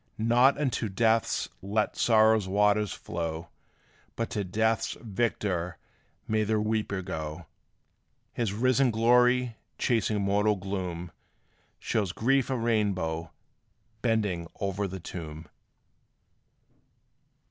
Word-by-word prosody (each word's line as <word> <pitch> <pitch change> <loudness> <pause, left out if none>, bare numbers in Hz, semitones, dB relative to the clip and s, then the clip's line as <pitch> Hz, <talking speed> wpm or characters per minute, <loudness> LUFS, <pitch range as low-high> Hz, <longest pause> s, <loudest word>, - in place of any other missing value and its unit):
Not 120 +5 +4
unto 125 -6 -1
death 110 +2 +1
let 105 +3 -1
sorrow's 110 -3 +4
waters 105 +1 +2
flow, 85 0 -5 0.7
But 115 - -3
to 105 - -1
death's 110 +4 0
victor 95 -6 -2 0.5
may 110 0 +1
the 110 0 +1
weeper 105 -3 -1
go! 80 -2 -5 0.9
His 115 -5 -1
risen 130 +5 +3
glory, 125 +1 +3 0.2
chasing 110 -3 +1
mortal 100 +2 +2
gloom, 90 -3 -4 0.7
Shows 100 -6 -1
grief 135 +3 +2
a 130 - 0
rainbow, 95 -8 0 0.7
bending 105 -8 0
o'er 100 0 -1
the 95 0 -6
tomb. 80 -2 -8
105 Hz, 100 wpm, -28 LUFS, 95-115 Hz, 0.9 s, Not